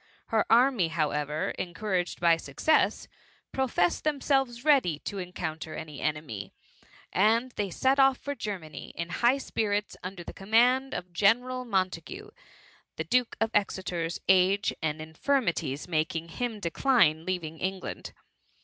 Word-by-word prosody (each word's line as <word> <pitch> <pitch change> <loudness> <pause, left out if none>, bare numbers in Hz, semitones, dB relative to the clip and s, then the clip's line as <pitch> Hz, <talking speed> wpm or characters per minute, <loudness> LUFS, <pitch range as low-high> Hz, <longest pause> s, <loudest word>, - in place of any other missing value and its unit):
Her 220 -2 +2
army, 240 -6 +4
how. 160 -2 0
ever, 150 +1 -2
encouraged 180 0 -2
by 170 -1 +5
success, 165 - +1 0.4
professed 245 -10 +1
them* 300 -2 0
selves 270 -3 0
ready 265 - +4
to 200 - -5
encounter 160 -3 -5
any 150 -3 -7
enemy, 150 -11 -3 0.6
and 225 +6 +3
they 205 -4 -2
set 265 +9 +1
off 270 -1 +5
for 285 - -4
Germany, 195 - -6
in 170 0 -3
high 240 +8 +3
spirits 205 -6 -2
under 185 -1 -7
the - - -8
command 245 +6 +2
of 180 0 -6
General 245 +7 +2
Montagu; 195 - -2 0.6
the 160 - -3
Duke 245 +9 +1
of 225 0 +1
Exeter's 180 -4 -1
age 190 +2 +4
and 155 0 -2
infirmities 160 - -1
making 165 0 -1
him 230 +3 -3
de 170 -4 -3
cline 165 - +3
leaving 165 -3 -4
England. 190 0 -4
190 Hz, 140 wpm, -28 LUFS, 165-245 Hz, 0.6 s, by